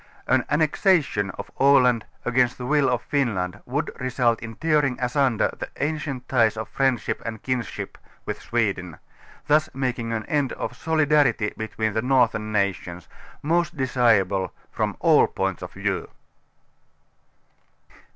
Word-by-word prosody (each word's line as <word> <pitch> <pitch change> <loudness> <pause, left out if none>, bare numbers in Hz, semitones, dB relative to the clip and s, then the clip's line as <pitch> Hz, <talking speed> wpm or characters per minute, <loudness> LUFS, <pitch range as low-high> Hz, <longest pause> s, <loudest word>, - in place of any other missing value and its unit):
An - - +2
annexation 150 - +2
of - - -7
Aland 125 -4 +4 0.2
against 125 0 +2
the 125 - -6
will 145 0 +3
of 125 -1 0
Finland 100 -9 -1
would 145 +5 -2
result 125 -2 +1
in 115 -1 -7
tearing 150 -4 +1
asunder 125 -2 +1
the - - -5
ancient 145 -4 -3
ties 115 -4 +2
of 110 - -4
friend 130 -3 +1
ship - - -4
and 110 -2 -6
kinskip 125 -3 -4 0.3
with - - -4
Sweden, 100 -8 -1 0.5
thus 155 +1 +3
making 125 -3 -2
an 110 -1 -2
end 145 -5 0
of 125 - -5
soli 160 +3 +1
darity 135 -8 +2
between 110 -1 -2
the 110 - 0
northern 120 -4 +2
nations, 90 -4 -2 0.4
most 170 +2 0
desirable 110 -8 +2 0.2
from - - -2
all - - +5
points - - -2
of - - -7
view. - - -2
125 Hz, 140 wpm, -24 LUFS, 110-140 Hz, 0.5 s, all